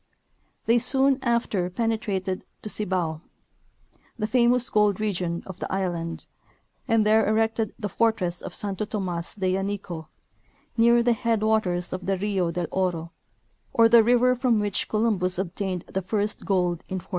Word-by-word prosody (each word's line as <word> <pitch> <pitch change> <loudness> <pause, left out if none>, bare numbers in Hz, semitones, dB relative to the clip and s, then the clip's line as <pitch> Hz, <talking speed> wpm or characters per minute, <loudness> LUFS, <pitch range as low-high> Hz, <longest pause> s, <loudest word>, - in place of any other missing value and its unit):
They 235 +1 +4
soon 265 +2 +3
after 230 -7 0
penetrated 200 -3 -2 0.2
the 215 - -5
Cibao, 180 -7 -1 1.0
the 215 - -1
famous 245 +1 +3
gold 210 -2 +2
region 180 -5 -2
of 190 - -9
the - - -5
island, 175 -3 -3 0.6
and 225 -1 +3
there 220 +1 +4
erected 220 0 0
the 210 - -3
fortress 195 -4 0
of - - -7
Santo 200 0 -2
Tomas 185 -5 -4
de 185 -2 0
Yanico, 195 -4 -4 0.7
near 235 +1 +5
the 240 0 +3
head 225 -1 0
waters 185 -5 +1
of 185 0 -5
the 195 -1 +1
Rio 190 -3 0
del 175 +1 -2
Oro, 175 -3 -1 0.6
or 230 -1 +6
the 230 0 +7
river 245 +2 +4
from 245 -2 +2
which 205 -1 -1
Columbus 210 -5 +1
obtained 185 0 -3
the 190 - -3
first 205 +2 -2
gold 180 -3 +1
in 190 - -3
1492. 180 - -10
205 Hz, 155 wpm, -25 LUFS, 180-225 Hz, 1.0 s, the